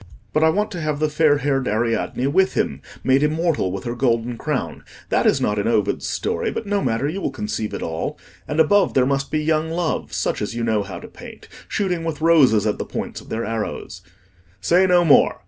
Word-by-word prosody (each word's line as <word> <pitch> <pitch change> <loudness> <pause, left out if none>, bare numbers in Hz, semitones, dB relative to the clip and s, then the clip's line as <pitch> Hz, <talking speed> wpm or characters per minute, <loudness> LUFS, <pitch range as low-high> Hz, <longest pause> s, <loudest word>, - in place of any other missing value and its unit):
But 155 - +2
I 160 - +6
want 210 +6 0
to 175 -4 -5
have 155 -2 -1
the 155 -1 0
fair 150 -1 +3
haired 135 -2 0
Ariadne 115 +3 -1
with 190 +7 +2
him, - - -1 0.2
made 130 +1 +3
immortal 155 - +1
with 95 0 -5
her 120 - -3
golden 120 -1 0
crown—that - - -2
is - - +3
not 105 0 0
in 100 - -1
Ovid's 110 -3 0
story, - - -1
but - - -4
no 200 0 0
matter, 115 0 0
you 185 +6 -3
will - - -1
conceive 105 -3 -4
it - - -5
all—and 85 - -5
above 195 +5 +4
there 130 -2 +4
must 135 0 -1
be 155 -1 -1
young 155 0 +1
Loves, 165 0 -2
such - - -1
as 105 +2 -3
you 120 - -2
know 110 -2 +1
how 95 -3 -7
to - - -10
paint, - - -12 0.2
shooting 180 -5 -1
with 165 -2 -3
roses 145 -10 +4
at 105 - 0
the - - -1
points - - -5
of - - -16
their 115 +1 -2
arrows—" 105 -6 -4 0.6
"Say 180 - +3
no 175 -1 +4
more!" 150 - +5
140 Hz, 215 wpm, -21 LUFS, 115-160 Hz, 0.6 s, I